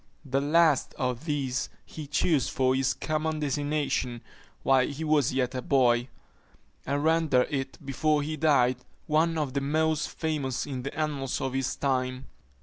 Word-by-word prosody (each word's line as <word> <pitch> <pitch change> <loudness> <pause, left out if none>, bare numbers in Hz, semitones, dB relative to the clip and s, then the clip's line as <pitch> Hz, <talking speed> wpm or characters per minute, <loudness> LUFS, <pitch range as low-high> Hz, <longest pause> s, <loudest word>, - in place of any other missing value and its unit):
The 135 0 0
last 155 -1 +3
of 125 +2 -2
these 135 -5 -1 0.2
he 155 -2 -8
chose 150 0 +1
for 130 -1 +2
his 130 0 +1
common 155 0 -2
designation 145 -4 -1 0.4
while 130 -1 +4
he 150 +2 -5
was 150 -4 +2
yet 130 -1 0
a 130 - -3
boy; 120 -2 +3 0.8
and 140 +2 0
rendered 160 -5 +3
it, 135 -1 -3
before 150 +2 +1
he 155 +2 -3
died, 140 -5 +3 0.3
one 160 +2 +2
of 145 -4 -2
the 140 - 0
most 155 +2 +1
famous 150 -6 -2
in 135 -3 -4
the 140 +3 -6
annals 145 -4 -1
of 135 -2 -2
his 135 -1 -1
time. 130 -1 -1
140 Hz, 155 wpm, -28 LUFS, 130-155 Hz, 0.8 s, while